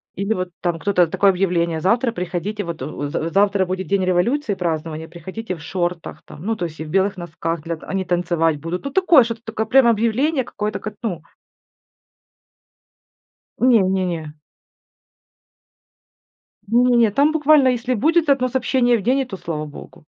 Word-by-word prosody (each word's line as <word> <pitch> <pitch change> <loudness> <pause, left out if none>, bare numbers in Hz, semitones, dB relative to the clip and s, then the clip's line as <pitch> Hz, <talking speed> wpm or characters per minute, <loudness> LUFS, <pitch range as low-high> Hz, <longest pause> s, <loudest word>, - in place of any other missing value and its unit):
Или 200 +3 -1
вот 185 -3 -3
там 175 -2 -1
кто-то 180 -2 +2
такое 195 +4 +3
объявление: 170 -3 0
"Завтра 230 +6 +2
приходите 180 +3 -3
вот 170 -3 -6
у 155 - -6
в - - -7
в 165 +1 -3
завтра 200 -1 +3
будет 185 -1 -4
день 195 +1 +1
революции, 205 +8 +1
празднование, 160 -3 -3
приходите 185 +5 -6
в 160 - -13
шортах 175 -1 -4
там". - - -12
Ну, 225 +1 0
то 175 - -3
есть 160 -2 -8
и 160 - -5
в - - -10
белых 195 +3 +1
носках, 165 -1 -4
для 165 0 -3
они 190 +4 -4
танцевать 170 -3 0
будут. 165 - -5
Ну, 280 - -3
такое, 335 -4 +5
что-то 230 -1 -5
такое 220 -1 -3
прям 250 +2 +5
объявление 235 +6 +1
какое-то 210 -1 -4
как, 215 -1 -7
ну 180 -8 -3 2.4
Не, 245 -3 +5
не, 190 0 +1
не. 160 -4 -4 2.3
Не 245 +3 +3
не, 230 -3 +4
там 285 +7 +3
буквально, 300 -3 +4
если 250 0 -1
будет 320 +6 +2
1 270 -2 +3
сообщение 245 -1 +2
в - - -5
день, 255 +6 +2
и 270 - 0
то 195 -6 -8
слава 165 -4 -4
Богу. 150 0 -12
195 Hz, 170 wpm, -20 LUFS, 170-235 Hz, 2.4 s, такое